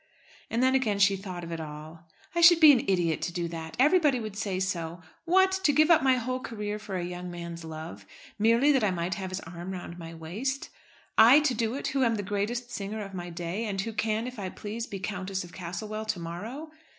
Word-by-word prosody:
And 235 +2 0
then 260 0 +4
again 235 -6 +2
she 200 0 +4
thought 185 -2 -7
of 170 - -7
it 165 - -4
all. 155 +2 -9 0.3
"I 340 - +1
should 345 0 +8
be 310 -2 +10
an 255 -4 +3
idiot 175 -5 +1
to 175 - -2
do 170 0 -2
that. 160 -1 -7
Everybody 295 -1 +4
would 215 -3 -6
say 200 -3 -2
so. 175 -2 -3 0.2
What! 380 +2 +4
to 300 - +5
give 310 +4 +4
up 330 - +6
my 260 -1 +4
whole 255 +1 -2
career 210 -4 -4
for 205 -2 -6
a 175 - -2
young 180 0 -6
man's 170 -1 -7
love, 155 -12 -8 0.3
merely 230 +7 +4
that 265 -5 +2
I 210 - +3
might 175 0 -2
have 190 +1 -4
his 185 +1 -4
arm 175 +3 -7
round 175 -1 -7
my 165 0 -8
waist? 215 +13 -4 0.5
I 240 +6 +9
to 295 -4 +1
do 230 +1 -1
it, 280 - -2
who 270 -1 +1
am 230 -2 +2
the 205 - -3
greatest 210 +5 -2
singer 210 +1 -4
of 195 -1 -9
my 175 -1 -5
day, 175 +5 -4
and 200 -3 -3
who 225 +3 -3
can, 220 +1 0
if 250 -2 -7
I 190 -2 -3
please, 220 +5 -6
be 200 - -5
Countess 190 0 -4
of 175 - -12
Castlewell 210 +5 -5
to 215 -4 -2
morrow! 220 - -6
200 Hz, 235 wpm, -28 LUFS, 175-245 Hz, 0.5 s, be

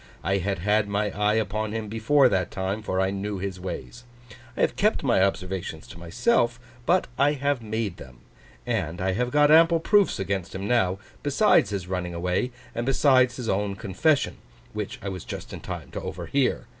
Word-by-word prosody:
I 95 +2 +1
had 100 +1 -1
had 105 +4 +1
my 100 0 0
eye 105 +2 +1
upon 110 0 -1
him 110 -1 -3
before 115 +6 +3
that 95 -6 0
time, 95 +3 -3
for 95 -3 -2
I 95 0 +1
knew 100 +1 -3
his 95 -1 -4
ways. 95 +6 -7 0.5
I - - -1
have - - +2
kept - - +1
my - - +3
observations 95 -4 -2
to 85 - -11
myself, 120 - +1 0.3
but 180 +1 +3
I 145 +2 +4
have 140 -2 -1
made 110 -3 -3
them; 65 -1 -12 0.5
and 90 -9 -2
I 95 +1 0
have 120 +6 -1
got 145 +2 +4
ample 165 +1 +6
proofs 205 +4 +3
against 95 -2 -3
him 95 +1 -4
now, 95 -6 +2 0.2
besides 145 - +3
his 100 -4 -3
running 90 -2 -3
away, 90 +7 0 0.2
and 120 - -2
besides 130 -2 +4
his 125 -3 -5
own 100 0 0
confession, 115 - +1 0.4
which - - -4
I 100 - -3
was 95 -3 -6
just - - -7
in - - -6
time - - -7
to - - -5
overhear. 135 -3 -1
105 Hz, 190 wpm, -25 LUFS, 95-125 Hz, 0.5 s, ample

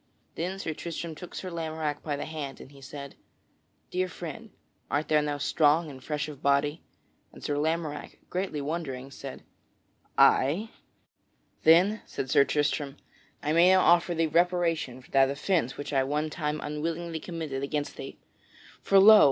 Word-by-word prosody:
Then 180 +3 -3
Sir 165 -5 -3
Tristram 165 +1 -5
took 175 +3 -10
Sir 185 - -5
Lamorack 160 -3 -3
by 150 -2 -2
the 140 - -4
hand, 150 -4 -6
and 135 - -12
he 140 -1 -15
said, 140 +1 -8 0.8
"Dear 185 +1 0
friend, 180 +6 -8 0.4
art 150 +2 -1
thou 150 -1 +4
now 145 -1 -2
strong 150 +2 +2
and 130 -1 -12
fresh 150 -1 -2
of 145 -3 -9
body?" 140 +3 +2 0.5
And - - -14
Sir 145 - -1
Lamorack, 155 0 -2
greatly 180 -5 -2
wondering, 140 -4 -4
said, 135 0 -8 0.7
"Ay." 175 - +4 0.9
"Then," 180 +7 +5
said 130 - -4
Sir 140 - +6
Tristram, 145 -1 -1 0.5
"I 150 +1 +1
may 170 +2 +6
now 190 0 +6
offer 175 0 +4
thee 165 0 +2
reparation 165 -5 +1
for - - -20
that 135 -1 +5
offence 140 -1 0
which 145 - -5
I 135 -1 +3
one 150 +3 -1
time 150 -1 -2
unwillingly 165 +2 -3
committed 160 -6 -5
against 145 +1 -2
thee. - - -8 0.6
For 195 - +4
lo! 210 +2 +10
155 Hz, 160 wpm, -28 LUFS, 145-170 Hz, 0.9 s, lo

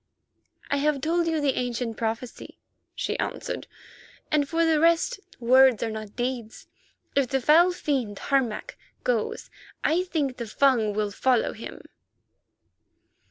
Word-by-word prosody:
"I 285 - +2
have 290 0 +1
told 335 +4 0
you 325 -1 +1
the 285 -2 +1
ancient 245 -2 -2
prophecy," 225 +2 -5 0.4
she - - -2
answered, - - -4 0.6
"and 290 -2 +2
for 330 0 +2
the 320 -2 +3
rest 335 +4 +3 0.2
words 255 0 +5
are 225 - -2
not 215 -1 -7
deeds. 245 -2 -4 0.5
If 275 -2 +3
the 270 +2 0
foul 325 +7 +5
fiend, 265 - -2
Harmac, 260 -4 -1 0.2
goes 235 -4 -1 0.3
I 330 +3 +2
think 315 -6 -1
that 255 - -13
the 235 -3 -5
Fung 230 -4 +3
will 210 -1 -1
follow 250 +3 +1
him. 225 - -9
260 Hz, 140 wpm, -26 LUFS, 230-300 Hz, 0.6 s, words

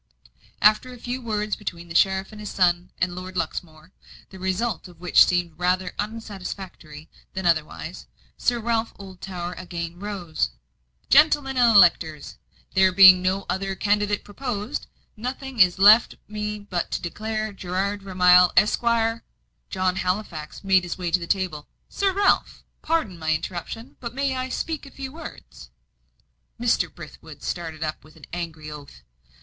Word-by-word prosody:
After 215 +4 +4
a 250 - -10
few 245 +2 -5
words 210 -3 -2
between 175 -5 -7
the 165 - -8
sheriff, 190 +2 +2
his 210 -1 -7
son, 175 -1 +1
and 180 0 0
Lord 185 +1 -7
Luxmore, 160 0 -5 0.4
the 190 - -11
result 190 +2 -2
of 175 -2 -17
which 180 0 +6
seemed 175 -3 -1
rather 180 +1 0
unsatisfactory 190 -7 -7 0.3
than 190 -1 -4
otherwise, 160 -3 -1 0.3
Sir 240 -1 0
Ralph 230 0 -1
Oldtower 185 -2 -7
again 175 -1 -6
rose. 185 - -2 0.6
"Gentlemen 290 -2 +5
and 240 -3 +5
electors, 165 -5 +4 0.3
there 190 0 +5
being 185 -1 +9
no 190 +1 0
other 190 +1 -2
candidate 205 0 0
proposed, 225 +2 -4 0.3
nothing 255 +2 -6
is 180 -2 +5
left 210 +4 +7
me 210 0 -4
but 200 -4 -4
to - - -2
declare 215 +4 -4
Gerard 195 +2 -2
Vermilye, 180 -2 +5
Esquire 230 +1 +2 0.2
" - - -48
John 185 -1 0
Halifax 180 -5 -3
made 190 -1 +4
his 175 -1 -5
way 175 -2 -3
to 180 - +3
the 170 - -6
table. 180 -7 -1 0.2
"Sir 395 -1 +1
Ralph, 400 +1 +1 0.2
pardon 275 - -1
my 160 0 +1
interruption, 175 +8 -6
but 235 -1 -7
may 275 -1 0
I 255 0 -3
speak 310 +2 -4
a - - -10
few 270 -1 -7
words?" 325 0 -11 0.9
Mr. 240 -1 +1
Brithwood - - -12
started 160 -2 -4
up 155 0 -4
with 155 - -18
an - - -13
angry 160 -3 -5
oath. 140 - -11
190 Hz, 150 wpm, -24 LUFS, 175-220 Hz, 0.9 s, being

